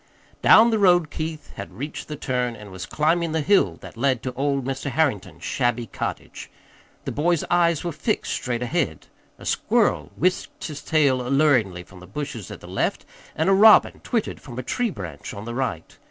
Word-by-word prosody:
Down 230 +2 +7
the 220 - +1
road 175 -5 +4
Keith 155 -1 -5
had 100 -2 -8
reached 145 +5 -6
the 150 - -5
turn 125 -4 -2
and 105 -3 -11
was 95 -1 -7
climbing 160 +2 +1
the 160 - +1
hill 145 - +3
that - - -11
led 130 0 0
to 130 - -3
old 140 0 -1
Mr. 135 +1 -3
Harrington's 135 -7 -1
shabby 120 -1 0
cottage. - - -6 0.6
The - - -2
boy's 170 +2 +1
eyes 170 -2 +3
were 175 - -2
fixed 210 +8 -2
straight 125 -1 -2
ahead. 125 - -1 0.3
A - - -13
squirrel 75 -1 +1
whisked 185 +4 -1
his 150 -3 -6
tail 140 -5 +2
alluringly 125 -9 +2
from 90 +1 -15
the 90 - -13
bushes 120 - -6
at - - -9
the - - -11
left, - - -2 0.3
and 160 - 0
a 195 - +5
robin 215 +2 +6
twittered 230 -3 -2
from 120 -4 -10
a 130 - -3
tree 245 - -1
branch 85 - -7
on 100 +2 -7
the 120 - -5
right. 120 -11 -3
140 Hz, 190 wpm, -23 LUFS, 120-165 Hz, 0.6 s, Down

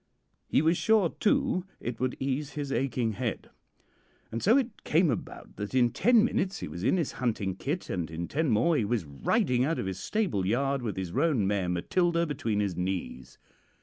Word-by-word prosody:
He - - +2
was 165 +2 +3
sure, 220 -6 +3
too, 255 -4 +2 0.2
it 120 -2 -5
would 130 0 -1
ease 140 +2 -2
his 145 -2 -4
aching 125 -4 0
head. 115 +1 -4 0.8
And 115 - -3
so 225 +7 +5
it 255 -3 -2
came 165 0 +3
about 115 - -6
that 105 +5 -4
in 120 -2 +4
ten 235 - +4
minutes 195 -5 -1
he - - -5
was 85 +4 -7
in 155 - +3
his 165 -6 -1
hunting 110 -6 -2
kit, 150 - -3
and 85 -4 -3
in 85 +2 -4
ten 155 0 0
more 140 +10 +3
he 135 - +2
was 105 -3 -1
riding 125 - +1
out 160 +5 0
of - - -2
his 95 0 -4
stable 195 - -1
yard 135 +7 0
with 110 -6 -4
his 95 -3 -3
roan 135 - +2
mare 95 -2 0
'Matilda' 170 - +1
between 115 -9 -1
his 100 -4 -1
knees. 75 -9 -4
125 Hz, 195 wpm, -29 LUFS, -, 0.8 s, so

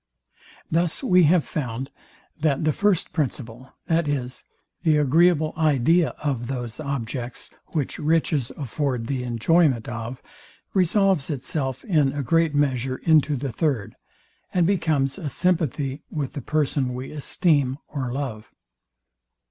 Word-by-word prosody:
Thus 170 - +1
we 180 -8 +5
have 165 +1 +4
found, 130 -1 -4 0.5
that 155 -2 +1
the 155 - +3
first 200 -4 +1
principle, 130 -4 -3 0.2
viz, 145 -7 -1 0.4
the 155 -2 +3
agreeable 155 +2 +3
idea 155 +2 +3
of 130 -5 -1
those 120 -4 -4
objects, 125 -4 -4 0.2
which 150 -5 -3
riches 150 -4 +1
afford 135 -3 -2
the 130 +1 -2
enjoyment 125 +1 +2
of; 120 +1 -6 0.5
resolves 190 -4 +2
itself 135 -2 -2
in 150 -8 +2
a 145 -1 -2
great 165 +3 +2
measure 130 -3 +1
into 155 -2 +3
the 135 0 -3
third, 130 -5 -1 0.6
and 180 -2 +2
becomes 155 -6 +1
a 155 -6 -3
sympathy 150 -4 0
with 145 -4 -3
the 140 - -5
person 140 -4 0
we 130 +1 -6
esteem 145 -3 +1
or 130 -4 -4
love. 125 -5 -5
145 Hz, 125 wpm, -24 LUFS, 130-160 Hz, 0.6 s, we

